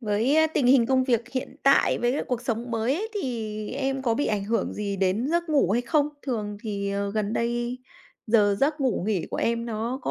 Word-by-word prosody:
Với 225 Hz, +5 st, +1 dB, 0.2 s
tình 260 Hz, -, +2 dB
hình 255 Hz, -2 st, +5 dB
công 260 Hz, 0 st, +2 dB
việc 240 Hz, -2 st, 0 dB
hiện 255 Hz, -1 st, -4 dB
tại 275 Hz, 0 st, +4 dB
với 245 Hz, +4 st, 0 dB
cuộc 245 Hz, -1 st, -2 dB
sống 235 Hz, -1 st, -3 dB
mới 230 Hz, +4 st, +1 dB
ấy 420 Hz, +8 st, -3 dB
thì 220 Hz, -, -4 dB
em 270 Hz, 0 st, -2 dB
có 235 Hz, -3 st, +1 dB
bị 290 Hz, -, 0 dB
ảnh 205 Hz, -2 st, -1 dB
hưởng 230 Hz, +3 st, -1 dB
gì 200 Hz, -1 st, -3 dB
đến 195 Hz, +6 st, +1 dB
giấc 340 Hz, 0 st, 0 dB
ngủ 285 Hz, -, +3 dB
hay 240 Hz, -, +1 dB
không? 295 Hz, +3 st, +2 dB
Thường 210 Hz, -6 st, -3 dB
thì, 200 Hz, -2 st, -3 dB
ờ, 200 Hz, 0 st, -2 dB
gần 210 Hz, 0 st, -1 dB
đây 240 Hz, +2 st, -1 dB, 0.5 s
giờ 210 Hz, -3 st, +3 dB
giấc 295 Hz, +2 st, +1 dB
ngủ 255 Hz, -9 st, 0 dB
nghỉ 195 Hz, -7 st, 0 dB
của -, -, -3 dB
em 235 Hz, 0 st, 0 dB
nó 230 Hz, +3 st, -3 dB
có -, -, -2 dB
235 Hz, 220 wpm, -25 LUFS, 215-265 Hz, 0.5 s, hình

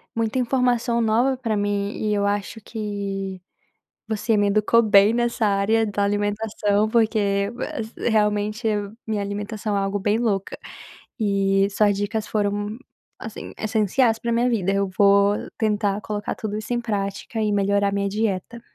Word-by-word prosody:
muita 230 Hz, +2 st, 0 dB
informação 245 Hz, -1 st, +1 dB
nova 235 Hz, +4 st, +2 dB
para 225 Hz, -4 st, -1 dB
mim 205 Hz, 0 st, -1 dB
e 215 Hz, -1 st, -1 dB
eu 200 Hz, -1 st, +1 dB
acho 205 Hz, +2 st, -2 dB
que 200 Hz, -3 st, -5 dB, 0.7 s
você 220 Hz, 0 st, 0 dB
me 205 Hz, 0 st, +3 dB
educou 215 Hz, +3 st, +3 dB
bem 205 Hz, 0 st, +5 dB
nessa 235 Hz, -2 st, +1 dB
área 210 Hz, +3 st, +2 dB
da 205 Hz, 0 st, -1 dB
alimentação, 205 Hz, +1 st, 0 dB
porque, 215 Hz, -3 st, +1 dB, 0.6 s
realmente, 210 Hz, +1 st, +1 dB, 0.4 s
minha 215 Hz, -2 st, -1 dB
alimentação 205 Hz, +1 st, -3 dB
é 200 Hz, -, +1 dB
algo 195 Hz, +1 st, -1 dB
bem 205 Hz, +3 st, +1 dB
louca 205 Hz, -5 st, -1 dB, 0.6 s
e 195 Hz, -1 st, +2 dB
suas 205 Hz, 0 st, +2 dB
dicas 210 Hz, +1 st, -2 dB
foram, 205 Hz, 0 st, -1 dB, 0.4 s
assim, 220 Hz, -3 st, -8 dB
essenciais 220 Hz, +2 st, +1 dB
para 235 Hz, 0 st, -2 dB
minha 240 Hz, +2 st, +2 dB
vida. 195 Hz, -5 st, 0 dB
Eu 195 Hz, 0 st, +1 dB
vou 200 Hz, 0 st, +5 dB, 0.2 s
tentar 210 Hz, -2 st, 0 dB
colocar 210 Hz, -2 st, -3 dB
tudo 215 Hz, -1 st, -4 dB
isso 225 Hz, +3 st, -3 dB
em 240 Hz, -, 0 dB
prática 205 Hz, 0 st, -3 dB
e 210 Hz, -, +1 dB
melhorar 200 Hz, 0 st, +2 dB
minha 200 Hz, 0 st, 0 dB
dieta. 210 Hz, +2 st, -2 dB
210 Hz, 145 wpm, -23 LUFS, 200-225 Hz, 0.7 s, bem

